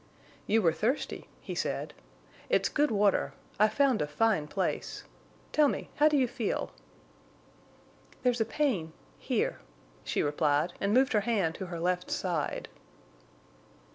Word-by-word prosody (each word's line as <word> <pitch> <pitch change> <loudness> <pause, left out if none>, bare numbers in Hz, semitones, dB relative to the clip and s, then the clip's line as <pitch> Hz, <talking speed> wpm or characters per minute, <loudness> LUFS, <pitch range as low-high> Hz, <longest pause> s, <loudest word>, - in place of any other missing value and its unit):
"You 220 0 +3
were 165 -2 +4
thirsty," 225 - -2
he - - -6
said. - - -2 0.6
"It's - - +3
good 295 0 +2
water. 205 -2 +2 0.3
I've 215 +1 +4
found 270 -5 +3
a 150 - 0
fine 155 0 +1
place. 190 +4 -2 0.5
Tell 300 -1 +5
me—how 295 +2 +1
do 300 -1 +3
you 260 -2 +3
feel?" 235 -3 -2 1.5
"There's 245 -2 +2
pain—here," 210 - -2 0.4
she - - 0
replied, 150 +3 +1
and 200 - +1
moved 260 +4 +4
her 210 - +4
hand 200 -7 +1
to 190 - -6
her 170 -1 -5
left 180 +1 -1
side. 170 -5 -2
210 Hz, 130 wpm, -30 LUFS, 170-250 Hz, 1.5 s, Tell